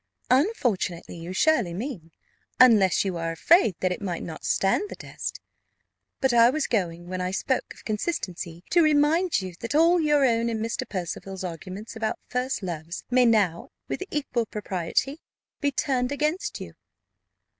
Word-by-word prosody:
"Unfortunately, 250 - +1
you 170 +1 -7
surely 215 - +2
mean; 195 - -6 0.5
unless 210 -8 +6
you 185 -3 -2
are 165 0 -2
afraid 220 - +4
that 185 - +1
it 180 - -4
might 180 -4 -3
not 160 -2 -8
stand 290 - +1
the - - -7
test. - - -6 0.8
But 265 -3 +2
I 235 0 +7
was 295 +3 0
going, 175 -5 -2
when 185 0 -4
I 180 - -1
spoke 230 +7 -1
of - - -17
consistency, 180 - -3
to 345 - +5
remind 310 - +3
you 185 -1 -6
that 230 +3 -4
all 335 +3 +5
your 295 -2 +3
own 235 -1 +2
and 225 -1 -2
Mr. 225 +1 -3
Percival's 190 +1 -5
arguments 185 +6 -7
about 225 -1 -2
first 250 -2 -2
loves 170 -1 -5
may 250 0 +5
now, 200 -7 +2 0.2
with - - -4
equal 250 -6 -1
propriety, 210 - -2 0.4
be 285 -1 +1
turned 260 -2 0
against 305 +8 -1
you." - - -8
225 Hz, 160 wpm, -26 LUFS, 180-280 Hz, 0.8 s, I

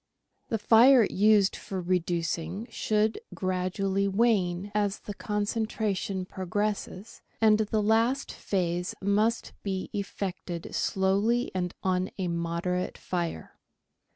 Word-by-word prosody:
The 225 - 0
fire 235 +4 +7
used 205 -1 +4
for 190 - -5
reducing 175 +1 -1
should 215 - +1 0.2
gradually 190 +1 0
wane 195 -3 +1
as 205 -1 0
the 205 - -6
concentra 210 0 -1
tion 190 -1 -3
progresses, 200 +3 -3 0.2
and 215 -1 +5
the 215 0 0
last 230 +5 +2
phase 180 -2 -2
must 210 +4 +1
be 190 -2 -3
effected 190 -4 -4
slowly 200 +6 +1
and 180 -1 -2
on 185 0 +1
a 185 -2 -1
moderate 170 +2 -2
fire. 170 - -4
195 Hz, 110 wpm, -28 LUFS, 180-215 Hz, 0.2 s, fire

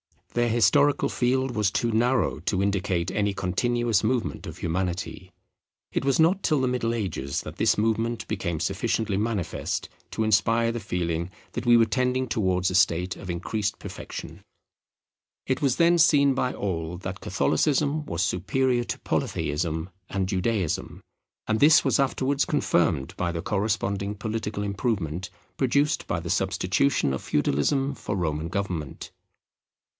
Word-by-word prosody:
Their 120 0 +2
historical 120 +6 +3
field 130 +1 +1
was 105 -3 +2
too 115 +4 0
narrow 120 - +1
to 95 +4 0
indicate 95 -3 0
any 105 0 0
continuous 115 +3 +1
movement 120 -6 -1
of 80 +1 -8
Humanity. 90 +1 -3 0.6
It - - -1
was 135 +2 +3
not 180 +5 +3
till 155 -6 +2
the 130 - +1
Middle 120 -2 0
Ages 80 - -3
that - - -9
this - - +3
movement 115 +1 0
became 85 -4 -2
sufficiently 100 +3 -1
manifest 105 -4 -2 0.2
to 110 - -1
inspire 115 +2 +3
the 120 - -3
feeling 85 -4 -2 0.2
that - - -5
we 120 - +7
were 115 - +5
tending 125 +2 0
towards 95 -5 +1
a - - -2
state 90 0 +2
of 95 - -9
increased 100 +4 -2
perfection. - - -8 1.0
It 130 - -1
was 135 -4 +2
then 170 +1 +4
seen 140 -3 +5
by 125 -1 -1
all 85 -3 -3
that 95 0 -6
Catholicism 145 - +1
was - - -1
superior 120 +6 +1
to - - -4
Polytheism 80 +3 -2 0.2
and 95 -2 -1
Judaism; 95 -2 -1 0.4
and 110 0 0
this 150 +1 +7
was - - +2
afterwards 135 +1 +1
confirmed 85 - +1
by 85 -1 -1
the 85 -1 -3
corresponding 100 0 -1
political 105 -1 -3
improvement 95 - -2 0.3
produced 140 +4 +1
by 85 - -1
the 85 - -6
substitution 95 - +1
of 65 - -3
Feudalism 135 - +1
for 105 - -4
Roman 80 -3 -1
government. 90 -6 -4
105 Hz, 145 wpm, -26 LUFS, 90-125 Hz, 1.0 s, we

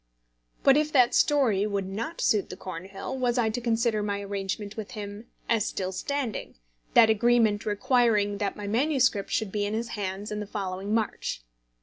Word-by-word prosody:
But 275 0 +6
if 305 0 +1
that 250 -3 +5
story 230 -9 +3
would 200 -2 -2
not 230 - -4
suit 210 -3 +2
the 185 - -7
Cornhill, 190 +5 -6
was 250 -1 0
I 225 -3 +2
to 245 +3 -3
consider 230 -2 +1
my 205 -1 -2
arrangement 200 +1 -4
with 220 +2 -7
him 205 +2 -7 0.2
as 225 -3 +2
still 185 -1 -3
standing, 260 +3 -3 0.4
that 225 -2 +8
agreement 220 -2 +3
requiring 210 -2 +2
that 205 -2 -1
my 205 - -6
MS. 255 +3 +2
should 220 -4 -1
be 205 0 -1
in 205 +1 -1
his 230 +1 -3
hands 200 0 -4
in 210 - -3
the 210 - -5
following 195 -1 -4
March? 215 - -2
210 Hz, 180 wpm, -27 LUFS, 200-240 Hz, 0.4 s, that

